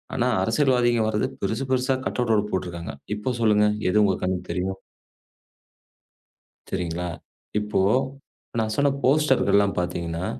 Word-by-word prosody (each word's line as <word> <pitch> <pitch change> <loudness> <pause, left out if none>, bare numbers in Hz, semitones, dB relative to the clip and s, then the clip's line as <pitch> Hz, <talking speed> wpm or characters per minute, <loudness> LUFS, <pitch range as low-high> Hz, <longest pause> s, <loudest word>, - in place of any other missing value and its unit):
ஆனா 125 0 +1 0.2
அரசியல்வாதிகள் 120 -1 +2
வர்றது 110 +4 0
பெருசு, 110 +7 -1
பெருசா 130 +1 +2
கட்அவுட் 110 -4 +1
போட்டுருக்காங்க. 85 -5 -3 0.2
இப்போ 105 +5 -2
சொல்லுங்க 105 -1 +4 0.2
எது 105 +3 +4
உங்க 95 - +2
கண்ணு 90 -1 0
தெரியும்? 95 +1 -2 1.9
சரிங்களா? 90 -1 -3 0.5
இப்போ 105 -2 0 0.8
நான் 110 -1 0
சொன்ன 140 0 +3
போஸ்டர் 140 0 +3
எல்லாம் 100 -1 +3
பாத்தீங்கன்னா 85 0 -3
105 Hz, 115 wpm, -24 LUFS, 90-125 Hz, 1.9 s, சொல்லுங்க